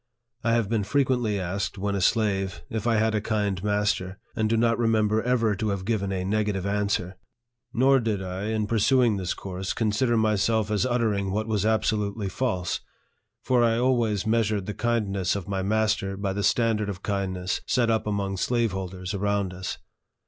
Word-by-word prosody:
I 115 0 +2
have 115 -3 +2
been 110 -1 0
fre 140 +8 +2
quently 125 -6 0
asked, 95 +3 -3
when 100 +1 -1
a 100 - -1
slave, 100 -2 +1
if 110 +1 -2
I 115 - +3
had 110 0 +2
a 105 - +1
kind 100 -4 -1
master, 105 -2 0 0.2
and 110 -1 +1
do 115 - +2
not 115 0 +2
remember 110 -2 +2
ever 115 -4 +1
to 105 +3 -2
have 100 -2 -3
given 100 -3 -1
a 95 -1 -2
negative 105 -2 0
answer;. 100 -2 -1 0.5
nor 135 +3 +4
did 110 -4 -1
I, 95 +1 -4
in 110 -1 0
pursuing 115 +1 +3
this 90 -3 -2
course, 95 0 -4
consider 115 +2 +1
myself 110 0 +1
as 105 +4 +1
uttering 110 -5 0
what 105 +3 -1
was 110 -2 0
absolutely 105 -2 0
false; 95 -5 -1 0.6
for 125 -2 +3
I 115 -1 +3
always 120 -5 +1
measured 110 -3 +1
the 105 - -4
kindness 100 -6 0
of 100 -1 -5
my 95 -1 -1
master 105 -1 0
by 100 -1 -2
the 100 - -2
standard 105 0 +2
of 95 -3 -6
kindness 95 -2 -2
set 120 -3 +2
up 110 -1 0
among 100 -2 -1
slaveholders 95 -5 -1
around 100 -1 0
us. 95 0 -5
105 Hz, 180 wpm, -26 LUFS, 95-115 Hz, 0.6 s, nor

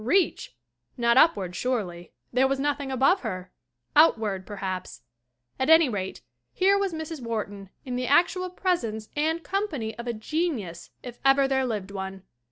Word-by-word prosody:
Reach? 325 - +1 0.4
Not 235 -1 +3
upward, 200 - +4
surely; 185 -10 -3 0.2
there 260 +2 +4
was 270 0 -1
nothing 285 -1 -1
above 270 +9 +3
her. 185 -5 -5 0.4
Out 310 -4 +7
ward, 200 -4 -3
perhaps. 190 - -5 0.6
At 260 - +1
any 320 -3 +7
rate, 190 -4 -4 0.3
here 390 +2 +4
was 400 -1 0
Mrs. 315 -2 -6
Wharton 205 -4 -4 0.2
in 250 -1 -3
the 250 0 -2
actual 360 +5 +3
presence 240 - -2
and 320 +3 0
company 305 - -2
of 235 - -6
a 240 - -1
genius 225 - -3
if 245 -1 -9
ever 270 0 +5
there 265 -1 +1
lived 205 -4 -3
one. 190 -1 -6
250 Hz, 160 wpm, -26 LUFS, 205-315 Hz, 0.6 s, Out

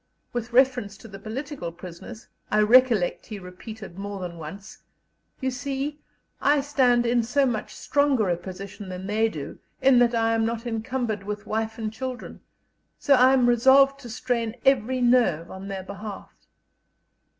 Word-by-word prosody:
With 240 -1 -4
reference 245 -5 +2
to 225 - -13
the 195 -2 -10
political 230 - -5
prisoners, 180 +6 -10 0.2
I 215 - +3
recollect 225 -4 +4
he 215 - -6
repeated 190 +1 -10
more 200 0 -5
than 175 -2 -6
once: 190 +5 -9 0.6
"You 260 -1 -1
see, 275 +3 -4 0.4
I 290 0 +3
stand 255 -4 +2
in 240 0 +3
so 270 +5 +1
much 230 -5 -3
stronger 285 -7 +1
a 175 - +2
position 190 +3 -9
than 185 0 -6
they 220 +3 +1
do, 150 -8 -7 0.2
in 260 -2 +5
that 240 -1 +3
I 225 0 +2
am 225 0 +1
not 230 +1 -2
encumbered 225 -1 -2
with 205 +1 -6
wife 220 +1 -2
and 220 -1 -4
children; 255 +2 -6 0.6
so 285 - +3
I 260 0 +6
am 255 -2 +4
resolved 265 +3 +5
to 245 -4 -10
strain 230 -1 -2
every 260 -1 +2
nerve 240 -10 +3
on 190 +1 -8
their 195 -1 -5
behalf." 200 +1 -8
225 Hz, 160 wpm, -25 LUFS, 200-255 Hz, 0.6 s, I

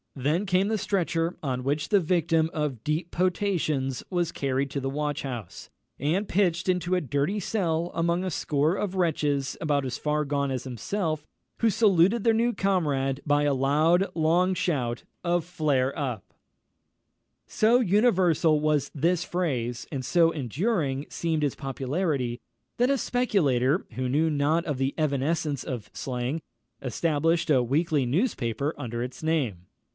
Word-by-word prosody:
Then 150 +8 0
came 185 +1 +2
the 220 0 0
stretcher, 170 -3 -1
on 130 -3 -2
which 145 +4 -1
the 205 - +5
victim 165 -1 +2
of 145 -7 -2
deep 155 +4 -2
potations 170 -8 0
was 175 -3 0
carried 135 0 -1
to 140 - -2
the 135 - -2
watch 150 +2 -2
house, 120 -9 -7 0.3
and 170 +9 0
pitched 175 -2 +1
into 180 0 +1
a 180 - +1
dirty 145 - -1
cell, 175 -4 -1
among 170 +2 0
a 185 - -2
score 150 +2 +1
of 195 -2 -3
wretches 145 -6 0
about 145 -3 +1
as 130 +1 -3
far 150 0 0
gone 140 -1 -1
as 130 -1 -3
himself, 155 - -3 0.3
who 230 - +3
saluted 200 0 +3
their 230 - +4
new 235 +2 +2
comrade 145 - 0
by 145 0 +3
a 145 -1 +2
loud, 155 +7 +3
long 170 +3 +3
shout 125 -10 -1 0.2
of 175 -2 +1
flare 150 -6 0
up! 125 - -4 1.1
So 230 +3 +3
universal 185 -8 +3
was 150 -2 +1
this 170 +4 +1
phrase, 125 -11 -2
and 135 -4 -3
so 165 +3 +3
enduring 145 - -1
seemed 160 -2 -1
its 145 - 0
popularity, 135 -2 -2 0.4
that 245 +2 +3
a 275 - +3
speculator, 170 - +1
who 130 0 -3
knew 155 +5 +2
not 150 +3 +1
the 135 +1 0
evanescence 145 -1 0
of 120 -5 -5
slang, 130 +4 -3 0.4
established 160 +4 0
a 130 -4 +4
weekly 145 +2 +1
newspaper 140 - 0
under 120 -4 -4
its 125 +5 -7
name. 125 - -1
155 Hz, 150 wpm, -26 LUFS, 135-175 Hz, 1.1 s, the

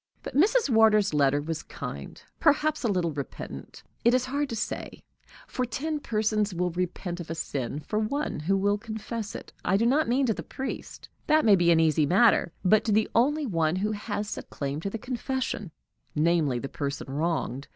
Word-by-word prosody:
But - - -7
Mrs. 430 - +4
Wardour's 220 - +4
letter 145 -1 +3
was 160 +2 -4
kind - - -7 0.2
perhaps 305 -1 +2
a - - +2
little 180 -5 0
repentant; 135 - -7 0.2
it 235 +2 +5
is 255 0 +1
hard 285 +2 -1
to 230 - -3
say, 225 - -5 0.4
for 255 - -3
ten 295 +6 -2
persons 215 -5 0
will 180 +1 0
repent 180 0 -3
of 170 - -7
a 165 - -3
sin 145 -3 -3
for 210 +7 -2
one 260 - -2
who 190 +6 +1
will 205 +1 +1
confess 220 0 -5
it - - -9
I 195 - +2
do 230 - +2
not 275 +3 +3
mean 265 +3 +3
to 225 - +2
the - - -6
priest 265 - -6 0.2
that 310 -2 +4
may 210 -3 +7
be 175 -2 +3
an 165 -1 +5
easy 155 -2 +3
matter, 190 0 +4
but 215 +3 +5
to 220 - +1
the 215 +1 +2
only 290 +6 +2
one 165 -7 +1
who 205 +3 0
has 205 0 -3
a - - -5
claim 140 +1 -4
to 195 - -3
the 225 - -4
confession, 250 -4 -3 0.5
namely, 155 -4 +2
the 135 - -4
person 140 0 -4
wronged. 145 -2 -2
205 Hz, 195 wpm, -27 LUFS, 165-240 Hz, 0.5 s, may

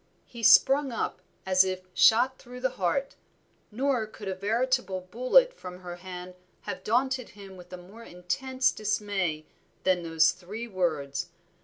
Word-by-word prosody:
He 235 - -11
sprung 270 +5 +6
up 230 - -3 0.2
as 185 0 +5
if 185 -1 -3
shot 245 +8 +4
through 250 0 -11
the 260 0 0
heart, 270 +11 0 0.6
nor 250 0 0
could 210 -1 -10
a 190 - -1
veritable 220 0 0
bullet 255 - +3
from 180 - -10
her 175 -1 -7
hand 180 0 -8 0.3
have 185 - -6
daunted 255 +2 0
him 195 -2 -12
with 180 -1 -14
a 180 - -6
more 190 +6 -14
intense 230 +8 -1
dismay 200 -7 -2 0.4
than 185 -1 +2
those 165 0 +3
three 195 +6 -8
words. 155 -9 -2
200 Hz, 150 wpm, -28 LUFS, 180-250 Hz, 0.6 s, sprung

